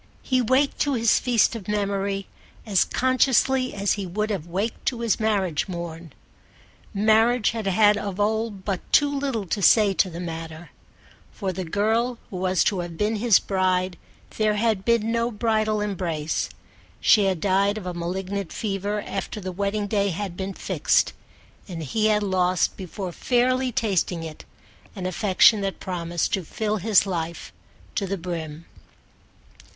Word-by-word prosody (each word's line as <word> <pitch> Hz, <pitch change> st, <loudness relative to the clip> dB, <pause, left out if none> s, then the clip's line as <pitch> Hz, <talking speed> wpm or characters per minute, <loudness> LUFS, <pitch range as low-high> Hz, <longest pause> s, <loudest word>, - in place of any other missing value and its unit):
He 255 Hz, -1 st, +1 dB
waked 260 Hz, +4 st, +2 dB
to 285 Hz, -, +1 dB
his 230 Hz, -2 st, +3 dB
feast 240 Hz, -2 st, +2 dB
of 210 Hz, -5 st, -8 dB
memory 200 Hz, -1 st, -1 dB, 0.4 s
as 200 Hz, -4 st, +3 dB
consciously 260 Hz, 0 st, +2 dB
as 200 Hz, 0 st, +1 dB
he 200 Hz, -2 st, -4 dB
would 210 Hz, +4 st, -2 dB
have 180 Hz, -5 st, -3 dB
waked 195 Hz, +6 st, -3 dB
to 240 Hz, -3 st, -1 dB
his 230 Hz, -1 st, +1 dB
marriage 195 Hz, -7 st, 0 dB
morn. 170 Hz, -3 st, -6 dB, 0.8 s
Marriage 220 Hz, +3 st, +3 dB
had 220 Hz, -3 st, -4 dB
had 205 Hz, +2 st, +4 dB
of 200 Hz, -1 st, -4 dB
old 215 Hz, -1 st, -1 dB
but 195 Hz, -3 st, -1 dB
too 285 Hz, 0 st, +4 dB
little 270 Hz, -7 st, -2 dB
to 195 Hz, +4 st, -2 dB
say 205 Hz, 0 st, +5 dB
to 190 Hz, -, +2 dB
the 170 Hz, 0 st, -7 dB
matter: 165 Hz, -1 st, -7 dB, 0.6 s
for 190 Hz, -3 st, -4 dB
the 185 Hz, +1 st, -4 dB
girl 220 Hz, +7 st, 0 dB
who 185 Hz, -, -5 dB
was 185 Hz, 0 st, +2 dB
to 195 Hz, -, 0 dB
have 175 Hz, -2 st, -5 dB
been 215 Hz, +3 st, 0 dB
his 225 Hz, -1 st, +5 dB
bride 185 Hz, -1 st, 0 dB, 0.4 s
there 215 Hz, -1 st, +2 dB
had 215 Hz, -2 st, +1 dB
been 230 Hz, -1 st, +2 dB
no 230 Hz, 0 st, +1 dB
bridal 215 Hz, -1 st, 0 dB
embrace. 170 Hz, -7 st, -2 dB, 0.5 s
She 210 Hz, -3 st, +5 dB
had 190 Hz, -3 st, 0 dB
died 200 Hz, +3 st, +2 dB
of 205 Hz, -, -7 dB
a 180 Hz, -, -3 dB
malignant 185 Hz, +2 st, -4 dB
fever 205 Hz, 0 st, -2 dB
after 195 Hz, +2 st, -5 dB
the 185 Hz, -2 st, -5 dB
wedding 200 Hz, +3 st, -1 dB
day 200 Hz, -1 st, +1 dB
had 185 Hz, 0 st, -4 dB
been 190 Hz, +1 st, -5 dB
fixed, -, -, +1 dB, 0.5 s
and 170 Hz, -4 st, -6 dB
he 215 Hz, +10 st, +1 dB
had 210 Hz, -1 st, +2 dB
lost 185 Hz, -2 st, +1 dB
before 185 Hz, 0 st, -6 dB
fairly 255 Hz, +5 st, +1 dB
tasting 190 Hz, -6 st, 0 dB
it 155 Hz, -2 st, -9 dB, 0.5 s
an 185 Hz, -3 st, -5 dB
affection 200 Hz, +3 st, +4 dB
that 195 Hz, -1 st, -3 dB
promised 175 Hz, -2 st, -2 dB
to 190 Hz, -, 0 dB
fill 215 Hz, +6 st, -2 dB
his 205 Hz, 0 st, +3 dB
life 170 Hz, -3 st, -4 dB, 0.4 s
to 200 Hz, -, -2 dB
the 195 Hz, +1 st, -2 dB
brim. 165 Hz, -2 st, -6 dB
200 Hz, 160 wpm, -24 LUFS, 185-220 Hz, 0.8 s, say